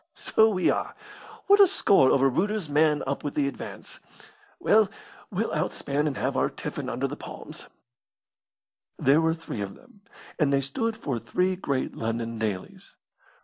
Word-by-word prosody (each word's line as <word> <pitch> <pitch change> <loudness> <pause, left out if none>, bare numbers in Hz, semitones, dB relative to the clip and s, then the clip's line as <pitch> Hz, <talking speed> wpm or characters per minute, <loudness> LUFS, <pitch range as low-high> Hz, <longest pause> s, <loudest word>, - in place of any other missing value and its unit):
"So 220 0 +3
we 185 -4 +2
are! - - -3 0.5
What 405 +1 +6
a 400 - +9
score 195 - +4
over 135 0 +4
Reuter's 195 +7 0
man 150 0 +2
up 140 +1 -3
with 145 - -4
the 145 -2 +2
advance! 140 - -8 0.6
Well, 215 -1 +4 0.4
we'll - - -2
outspan 145 +2 -1
and 140 - -2
have - - -1
our - - +2
tiffin - - -5
under - - -1
the - - -6
palms." - - -10 1.3
There 140 +4 +4
were 160 0 +2
three 165 -10 -6
of 100 -1 -5
them, 205 - -21 0.4
and 150 -3 +3
they 140 0 +3
stood 220 - -2
for 130 -5 -3
three 185 +9 0
great 140 -8 -2
London 115 0 -3
dailies. 105 -4 -5
145 Hz, 160 wpm, -26 LUFS, 130-190 Hz, 1.3 s, a